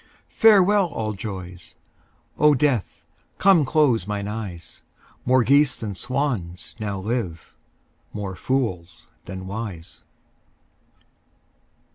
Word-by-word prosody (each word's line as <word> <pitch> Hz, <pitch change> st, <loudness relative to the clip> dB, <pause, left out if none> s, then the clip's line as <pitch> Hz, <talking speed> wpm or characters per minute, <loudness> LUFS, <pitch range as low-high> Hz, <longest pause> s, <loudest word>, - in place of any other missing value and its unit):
Farewell, 205 Hz, -3 st, +5 dB
all 110 Hz, -9 st, -3 dB
joys; 90 Hz, -6 st, -8 dB, 0.6 s
O 150 Hz, -1 st, +6 dB
Death, 125 Hz, -, -1 dB, 0.3 s
come 190 Hz, -5 st, +5 dB
close 130 Hz, -, +2 dB
mine 100 Hz, -1 st, -3 dB
eyes; 105 Hz, -6 st, -7 dB, 0.4 s
More 130 Hz, 0 st, +4 dB
geese 140 Hz, +1 st, +3 dB
than 105 Hz, -3 st, -4 dB
swans 105 Hz, -, -3 dB
now 100 Hz, -3 st, -3 dB
live, 95 Hz, -6 st, -4 dB, 0.6 s
more 100 Hz, -3 st, -5 dB
fools 90 Hz, -11 st, -3 dB, 0.2 s
than 95 Hz, -1 st, -7 dB
wise. 100 Hz, -4 st, -7 dB
110 Hz, 95 wpm, -23 LUFS, 95-135 Hz, 0.6 s, O